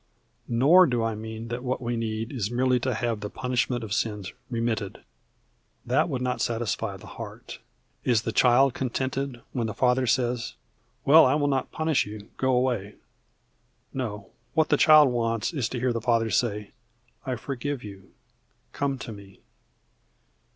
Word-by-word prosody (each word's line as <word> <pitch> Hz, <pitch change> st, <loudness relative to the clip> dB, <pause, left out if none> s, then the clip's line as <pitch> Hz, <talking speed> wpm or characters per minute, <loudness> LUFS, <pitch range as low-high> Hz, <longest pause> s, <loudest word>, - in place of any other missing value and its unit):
Nor 145 Hz, +10 st, +6 dB
do 120 Hz, -4 st, 0 dB
I 115 Hz, 0 st, 0 dB
mean 110 Hz, +1 st, -7 dB
that 120 Hz, +1 st, -4 dB
what 130 Hz, 0 st, -1 dB
we 120 Hz, -1 st, -2 dB
need 115 Hz, 0 st, -3 dB
is 115 Hz, -7 st, -2 dB
merely 125 Hz, +1 st, +2 dB
to 130 Hz, 0 st, -1 dB
have 115 Hz, -1 st, -1 dB
the 105 Hz, -, -5 dB
punishment 125 Hz, 0 st, -1 dB
of 105 Hz, -2 st, -4 dB
sins 105 Hz, -3 st, -2 dB, 0.2 s
remitted. 115 Hz, -4 st, -2 dB, 0.8 s
That -, -, +2 dB
would 125 Hz, -1 st, -2 dB
not 125 Hz, 0 st, -1 dB
satisfy 115 Hz, -3 st, -2 dB
the 95 Hz, -, -14 dB
heart. -, -, -9 dB, 0.4 s
Is 115 Hz, -3 st, +2 dB
the 115 Hz, -, -2 dB
child 125 Hz, +3 st, +4 dB
contented 130 Hz, 0 st, -3 dB
when 120 Hz, -4 st, -1 dB
the 110 Hz, -, -5 dB
father 125 Hz, 0 st, +2 dB
says, 120 Hz, 0 st, 0 dB, 0.5 s
"Well, 155 Hz, +1 st, +8 dB
I 130 Hz, -, +3 dB
will 145 Hz, -1 st, +1 dB
not 135 Hz, -2 st, -1 dB
punish 160 Hz, -6 st, +1 dB
you. 105 Hz, 0 st, -9 dB
Go 130 Hz, 0 st, +1 dB
away"? 120 Hz, -5 st, 0 dB, 1.0 s
No, 105 Hz, -7 st, -5 dB, 0.2 s
what 160 Hz, -1 st, +3 dB
the 150 Hz, -, +5 dB
child 155 Hz, -2 st, +7 dB
wants 115 Hz, +3 st, -1 dB
is 130 Hz, -7 st, -1 dB
to 125 Hz, -, -4 dB
hear 125 Hz, 0 st, +1 dB
the 115 Hz, -, -2 dB
father 115 Hz, -1 st, +1 dB
say, 105 Hz, 0 st, 0 dB, 0.6 s
"I 130 Hz, -, 0 dB
forgive 135 Hz, +3 st, -4 dB
you. 100 Hz, -2 st, -11 dB, 0.6 s
Come 140 Hz, -1 st, -1 dB
to 125 Hz, -2 st, -7 dB
me." 100 Hz, -2 st, -12 dB
120 Hz, 165 wpm, -26 LUFS, 110-130 Hz, 1.0 s, Well